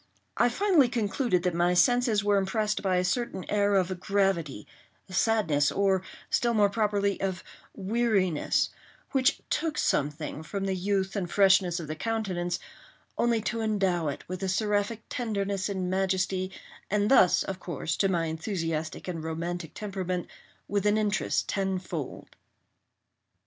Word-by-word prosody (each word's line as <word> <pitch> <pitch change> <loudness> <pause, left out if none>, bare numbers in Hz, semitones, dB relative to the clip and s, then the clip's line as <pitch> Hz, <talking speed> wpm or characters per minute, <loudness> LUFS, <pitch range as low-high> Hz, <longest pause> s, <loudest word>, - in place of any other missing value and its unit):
I 245 - +4
finally 335 -3 +3
concluded 215 -4 0
that 180 - +1
my 175 +1 +2
senses 240 +1 +3
were 205 0 +3
impressed 210 +2 -1
by 190 -2 +1
a 180 - +2
certain 190 0 -2
air 205 -1 +2
of 185 -1 +1
gravity, 190 - 0 0.5
sadness, 190 -8 +2
or, 195 -2 +2 0.3
still 235 -1 +2
more 205 -2 +4
properly, 200 -2 0
of 190 -2 -2 0.3
weariness, 200 -5 +1 0.4
which 265 +1 +2
took 310 -1 0
something 150 +1 -1
from 195 +5 -4
the 195 - 0
youth 190 +1 -1
and 185 -4 -2
freshness 190 -3 +4
of 165 - -5
the 155 - -4
countenance, 185 -4 -2 0.6
only 235 -2 +2
to 230 +1 -2
endow 195 -6 +1
it 140 - -5
with 185 0 -5
a 190 - -1
seraphic 210 +2 0
tenderness 200 -5 -2
and 190 -2 -2
majesty, 185 0 0 0.4
and 210 +2 +1
thus, 190 -9 +6
of 190 -1 -5
course, 170 -3 -3
to 195 - +2
my 170 -3 +1
enthusiastic 160 -1 -3
and 165 -3 -4
romantic 165 +1 -4
temperment, 185 -4 -3 0.4
with 205 0 0
an 210 +1 +3
interest 210 -1 0
tenfold. 185 -6 -3
195 Hz, 145 wpm, -28 LUFS, 180-210 Hz, 0.6 s, thus